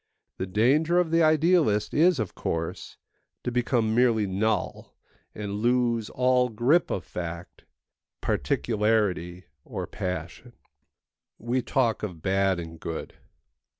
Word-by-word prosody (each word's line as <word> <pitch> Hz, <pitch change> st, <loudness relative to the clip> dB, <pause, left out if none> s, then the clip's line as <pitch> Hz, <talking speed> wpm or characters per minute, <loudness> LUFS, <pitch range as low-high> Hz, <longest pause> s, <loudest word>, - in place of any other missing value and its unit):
The 95 Hz, -, -2 dB
danger 140 Hz, -, +2 dB
of 175 Hz, -3 st, +2 dB
the 165 Hz, 0 st, +4 dB
idealist 155 Hz, -, +3 dB
is, 170 Hz, +2 st, +4 dB
of 110 Hz, -5 st, -3 dB
course, 80 Hz, 0 st, -4 dB, 0.5 s
to 125 Hz, -, -2 dB
become 120 Hz, -2 st, +1 dB
merely 115 Hz, -3 st, +3 dB
null 100 Hz, +1 st, -2 dB, 0.4 s
and 105 Hz, -1 st, -4 dB
lose 120 Hz, -2 st, +1 dB
all 125 Hz, 0 st, +2 dB
grip 125 Hz, +10 st, +2 dB
of 95 Hz, -, -2 dB
fact, 85 Hz, 0 st, -7 dB, 0.5 s
particularity, 105 Hz, -6 st, 0 dB, 0.2 s
or -, -, -5 dB
passion. 90 Hz, +7 st, -6 dB, 0.8 s
We 120 Hz, +3 st, -1 dB
talk 120 Hz, -3 st, 0 dB
of 90 Hz, -7 st, -6 dB
bad 95 Hz, -1 st, +1 dB
and 80 Hz, -1 st, -8 dB
good. 80 Hz, 0 st, -6 dB
110 Hz, 115 wpm, -26 LUFS, 95-125 Hz, 0.8 s, the